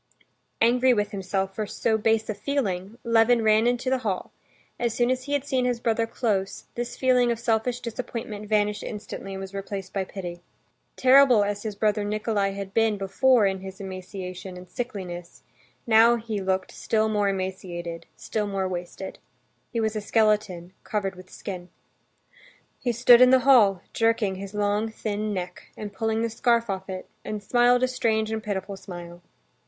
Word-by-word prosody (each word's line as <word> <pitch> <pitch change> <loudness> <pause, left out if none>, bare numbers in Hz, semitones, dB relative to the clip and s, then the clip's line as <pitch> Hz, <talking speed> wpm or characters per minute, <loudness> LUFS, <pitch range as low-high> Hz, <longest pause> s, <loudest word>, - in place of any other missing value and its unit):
Angry 250 +2 +4
with 205 -1 0
himself 195 0 -2
for 215 +1 -3
so 220 +2 0
base 220 0 +1
a 215 - -1
feeling, 205 -4 -2
Levin 230 0 +4
ran 220 +1 +4
into 245 +1 0
the 260 0 +2
hall; 205 -7 -3 0.5
as 235 -2 0
soon 240 +1 +2
as 255 0 -2
he 285 - -3
had 285 -1 0
seen 260 -3 0
his 245 -1 0
brother 230 -1 +1
close, 200 -5 -2
this 240 0 -4
feeling 250 -2 +3
of 235 - -1
selfish 235 +1 0
disappointment 225 -3 -5
vanished 210 -1 +1
instantly 205 -2 -6
and - - -5
was 195 0 -8
replaced 195 -1 -5
by 195 - 0
pity. 175 -2 -7 0.5
Terrible 260 -4 +6
as 205 0 -2
his 215 -2 -4
brother 210 0 +1
Nikolay 205 -1 0
had 195 -1 -6
been 225 -2 +2
before 215 +4 +3
in 190 -1 0
his 190 0 -9
emaciation 185 -1 -7
and 180 0 -11
sickliness, 185 -8 -6 0.4
now 230 +1 +6
he 220 -3 -4
looked 190 0 -1
still 220 -1 0
more 205 -2 +1
emaciated, 185 -3 -4
still 210 -2 -2
more 195 -1 -1
wasted. 180 +1 -6 0.5
He 235 - -1
was 220 -1 0
a 215 - -2
skeleton 210 -5 +1
covered 195 -2 -2
with 185 0 -13
skin. 180 -3 -7 1.1
He 245 - 0
stood 240 +1 +7
in 255 - +8
the 260 0 +5
hall, 205 -9 +5
jerking 225 -3 +2
his 200 +1 -8
long 210 +1 +1
thin 215 -1 -3
neck, 180 -2 -5
and 205 -1 -6
pulling 225 +2 -1
the 230 - 0
scarf 235 -1 +2
off 190 0 -5
it, 185 -1 -6 0.2
and 210 -1 -5
smiled 245 +3 +4
a - - +4
strange 220 -3 0
and 220 0 -2
pitiful 200 -2 -4
smile. 175 -2 -9
210 Hz, 175 wpm, -25 LUFS, 195-235 Hz, 1.1 s, in